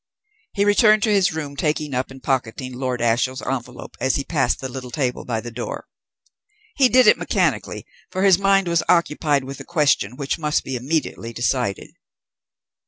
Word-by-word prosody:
He 200 0 +1
returned 215 +1 +4
to 220 - +2
his 195 -2 +3
room, 150 -3 -5
taking 150 0 -1
up 125 +1 -1
and 135 0 -13
pocketing 130 -1 -2
Lord 125 -1 -3
Ashiel's 120 +3 0
envelope 125 -2 -5
as 130 - +1
he 140 - -1
passed 140 -5 0
the 130 - -4
little 130 0 -7
table 125 0 -2
by 115 -3 -2
the 120 - -8
door. 120 +1 -6 0.9
He 265 -3 +4
did 255 0 +5
it 210 - +6
mechanically, - - -1 0.2
for 185 - -2
his 190 -2 +5
mind 195 -1 +3
was 170 -1 +2
occupied 150 -4 +2
with 135 +1 -8
a - - -7
question 145 - +1
which 140 +4 -3
must 150 -1 0
be 135 - -4
immediately 125 -3 -3
decided. 120 -4 -2
140 Hz, 175 wpm, -21 LUFS, 125-170 Hz, 0.9 s, it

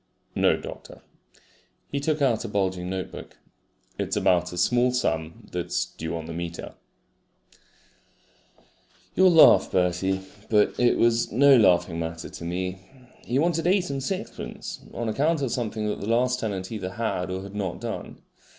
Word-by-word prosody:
"No, - - +3
doctor." - - -10 0.9
He 140 - -1
took 150 +1 0
out 120 -5 +2
a - - -4
bulging 95 -3 -1
notebook. 95 0 -6 0.6
"It's - - -1
about 90 -1 +2
a 90 - -7
small 120 +7 +3
sum 80 -10 -2
that's - - -1
due 80 +1 -6
on 80 - -6
the 80 - -6
meter." 85 0 -6 2.4
You'll 185 +1 +6
laugh, 165 -2 +7
Bertie, 95 +1 +1 0.3
but 105 -2 +3
it 120 -1 +4
was 115 0 +2
no 140 +4 +6
laughing 90 -6 +3
matter 80 0 -5
to - - -9
me. 90 +2 -3 0.5
He 125 - 0
wanted 165 +2 +1
eight 185 -3 +2
and 135 -1 -3
sixpence 185 +8 -5
on 120 - -4
account 145 +7 +1
of 130 - -1
something 110 -3 -2
that 105 - -2
the 100 - -4
last 125 +2 +2
tenant 100 -4 -4
either 95 -4 -4
had 100 -5 -2
or 95 +1 -4
had 100 0 -9
not 95 -4 -3
done. - - -6
105 Hz, 155 wpm, -25 LUFS, 90-125 Hz, 2.4 s, laugh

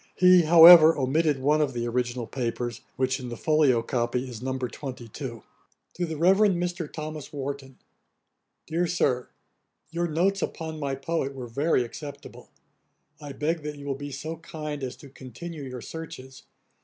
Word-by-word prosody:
He, 180 -1 +6
however, 165 0 +9
omitted 145 +2 +1
one 150 +3 +2
of 140 -3 0
the 120 0 -2
original 120 0 -2
papers, 120 -1 -4
which 130 +1 0
in 125 -1 -6
the 120 - -6
folio 145 -6 +3
copy 125 +2 -1
is 120 -3 -8
No. 130 +1 -2
22. 125 -1 -7 0.5
'To 180 - -2
THE 160 -1 -5
REVEREND 195 +4 +4
MR. 175 -2 -3
THOMAS 155 -2 -7
WARTON. 140 -2 -6 0.9
'DEAR 170 +2 -1
SIR, 125 -8 0 0.6
'Your 170 +1 -1
notes 185 +5 +1
upon 160 -1 -4
my 140 -2 -2
poet 140 -1 -3
were 130 -2 -6
very 135 +3 +1
acceptable. 140 +4 -10 0.7
I 145 -1 -7
beg 160 +4 -1
that 150 0 -6
you 145 - -10
will 140 - -1
be 145 +1 -7
so 155 +4 -6
kind 150 -3 -6
as 125 - -4
to 140 - -14
continue 140 +5 -9
your 130 -3 -7
searches. 145 -5 -9
145 Hz, 160 wpm, -26 LUFS, 130-160 Hz, 0.9 s, however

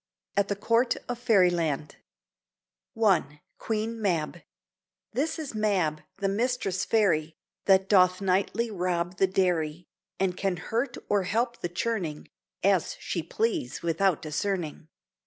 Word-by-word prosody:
AT 200 0 +2
THE 205 - -1
COURT 230 +5 +2
OF 245 -1 -3
FAIRYLAND 175 - +2 1.0
I 155 -9 +2 0.2
QUEEN 225 +1 -2
MAB 175 -4 -1 0.7
This 285 +7 0
is 310 -6 -5
MAB, 190 -8 +1 0.2
the 195 0 0
mistress 200 -3 0
Fairy, 165 -9 +2 0.3
That 190 -1 +5
doth 185 -2 +5
nightly 200 +4 0
rob 180 -2 -1
the 190 - +4
dairy, 175 -3 0 0.3
And 190 -2 +1
can 190 -1 -1
hurt 230 +9 -2
or 205 -1 +2
help 235 +6 -1
the 175 - -2
churning 175 -5 -3 0.3
(As 190 -3 +2
she 170 - -2
please) 210 - -2
without 170 +1 +1
discerning. 160 0 -3
190 Hz, 125 wpm, -28 LUFS, 170-215 Hz, 1.0 s, That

